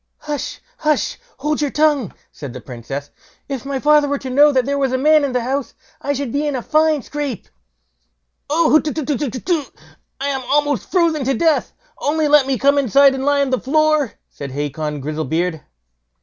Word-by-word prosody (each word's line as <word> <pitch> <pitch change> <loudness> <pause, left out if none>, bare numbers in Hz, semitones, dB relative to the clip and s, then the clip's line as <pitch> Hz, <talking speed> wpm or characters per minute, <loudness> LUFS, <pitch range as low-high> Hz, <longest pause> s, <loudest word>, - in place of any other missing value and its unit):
"Hush! 295 -1 -4 0.2
hush! 305 -1 0 0.2
hold 300 +2 -1
your 295 - +1
tongue!" 295 - +1 0.2
said 140 -5 -8
the 130 - -7
Princess; 135 +4 -7 0.4
"if 275 -1 -5
my 275 -1 -2
father 295 +1 +4
were 285 0 0
to 265 -1 -6
know 290 +3 +6
that 260 -3 +1
there 280 0 -1
was 270 -2 +1
a 260 - +1
man 305 +3 +4
in 280 - 0
the 250 -1 -1
house, 270 +2 -3 0.3
I 285 - -1
should 275 -3 -3
be 290 +3 -1
in 290 - -1
a 245 - -3
fine 310 -3 +2
scrape." 290 -7 -5 1.0
"Oh, 315 +2 +3
hutetutetutetu! 295 - -2 0.6
I'm 275 -1 -1
almost 290 -5 +1
frozen 335 -5 +2
to 270 +1 +1
death; 325 -2 +1 0.3
only 305 +1 +1
let 290 -2 +5
me 270 -1 0
come 280 +2 +3
inside 275 +2 +5
and 265 0 -3
lie 285 0 +2
on 275 -2 0
the 255 - +1
floor", 305 -1 +2 0.2
said 140 - -7
Hacon 145 +1 -3
Grizzlebeard. 160 +3 -2
280 Hz, 180 wpm, -19 LUFS, 250-295 Hz, 1.0 s, know